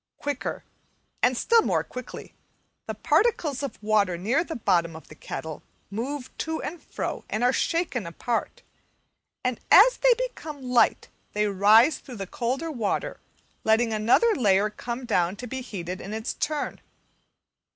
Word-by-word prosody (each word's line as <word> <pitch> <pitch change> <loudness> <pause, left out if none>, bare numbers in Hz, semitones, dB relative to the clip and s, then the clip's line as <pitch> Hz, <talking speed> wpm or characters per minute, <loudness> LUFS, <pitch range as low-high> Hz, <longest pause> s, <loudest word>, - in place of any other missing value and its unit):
Quicker, 285 -2 -4 0.6
and 250 0 +3
still 460 - +4
more - - +1
quickly, 255 -1 -9 0.5
the - - -4
particles 320 - +1
of 280 - -5
water 205 -4 +2
near 235 - +1
the 335 - -6
bottom 170 -7 +1
of 160 - -12
the - - -10
kettle 155 0 -7 0.3
move 260 +5 -5
to 320 0 -2
and 335 +1 -6
fro - - -5
and 215 +3 -1
are 250 +1 +4
shaken 325 - -1
apart; 230 +7 -3 0.8
and 250 -2 -1
as - - +8
they - - +5
become 325 - -5
light 250 -1 +2 0.2
they 210 0 +1
rise 210 +7 +5
through 255 - -10
the 195 -3 -5
colder 255 - -2
water 230 -8 -2 0.4
letting 225 +1 +3
another 235 - +4
layer 205 - +3
come 240 +3 -5
down 180 -5 +1
to 245 - -8
be 260 +2 -5
heated 185 -7 -6
in 205 +3 -6
its 220 +1 -3
turn. 300 -1 -3
245 Hz, 150 wpm, -26 LUFS, 210-290 Hz, 0.8 s, as